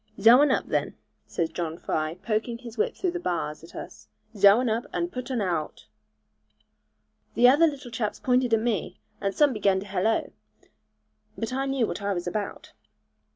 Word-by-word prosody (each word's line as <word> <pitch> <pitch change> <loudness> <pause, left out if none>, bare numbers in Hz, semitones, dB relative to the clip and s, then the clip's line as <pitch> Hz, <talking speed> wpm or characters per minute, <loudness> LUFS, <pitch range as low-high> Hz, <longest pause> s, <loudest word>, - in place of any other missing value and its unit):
'Zhow 230 +6 +8
un 295 - +4
up, 260 - +1
then,' - - -1 0.3
says 165 -1 -2
John 165 -1 -4
Fry 155 -1 -2
poking 220 +4 -2
his 235 -2 -10
whip 460 +2 0
through 365 - -1
the 350 - -4
bars 165 - -3
at 165 - -14
us; - - -9 0.3
'Zhow 200 +2 +6
un 255 - 0
up, 230 +4 -1
and 345 0 -2
putt 250 +1 -6
un 250 -4 -1
aowt.' 170 -6 -3 1.5
The 245 - +6
other 295 +6 +6
little 275 -5 -6
chaps 215 -3 -3
pointed 250 -1 +2
at 225 - +4
me, 225 -6 -2 0.2
and 195 -1 -1
some 295 -3 +4
began 200 -3 +2
to - - -8
hallo; 200 +3 0 1.1
but 225 +3 -3
I 270 +1 -1
knew 270 -3 +1
what 210 - -5
I 200 0 0
was 175 - -4
about. 200 +3 -5
225 Hz, 185 wpm, -26 LUFS, 190-255 Hz, 1.5 s, Zhow